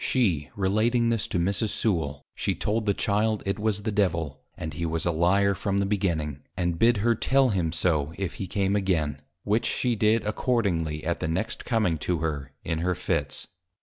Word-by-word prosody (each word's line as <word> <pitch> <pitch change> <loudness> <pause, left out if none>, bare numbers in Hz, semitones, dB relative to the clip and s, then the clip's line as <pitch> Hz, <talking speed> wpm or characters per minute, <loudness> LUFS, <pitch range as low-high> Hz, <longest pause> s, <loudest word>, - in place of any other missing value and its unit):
She 90 - +1
relating 110 +5 +2
this 115 -3 0
to - - -2
Mrs. 100 +5 +1
Sewal, 75 -11 -1
she - - -1
told 110 +1 -1
the 100 - +4
Child, 105 +1 +1
it 100 +1 -1
was 105 -1 0
the 110 - -1
Devil, 85 -8 0 0.2
and 80 -1 -5
he 85 - -4
was 80 0 -1
a 85 - +2
Lyar 95 +5 +3
from 100 +1 -1
the 100 - +2
Beginning, 85 -8 -1 0.2
and 85 -2 -1
bid 115 0 +5
her 120 - +5
tell 135 +3 +3
him 90 -6 0
so, 80 -4 0
if 95 -3 -3
he 95 - -3
came 100 +1 0
again: 80 -8 0 0.2
which 105 +3 +1
she 125 -2 0
did 110 0 +2
accordingly, 95 - 0
at 85 +1 -1
the - - -2
next 95 +8 -2
coming 105 -10 +1
to 90 +4 0
her, 75 -4 -3
in 80 - -2
her 90 +2 0
Fits. - - -2
95 Hz, 195 wpm, -26 LUFS, 80-105 Hz, 0.2 s, bid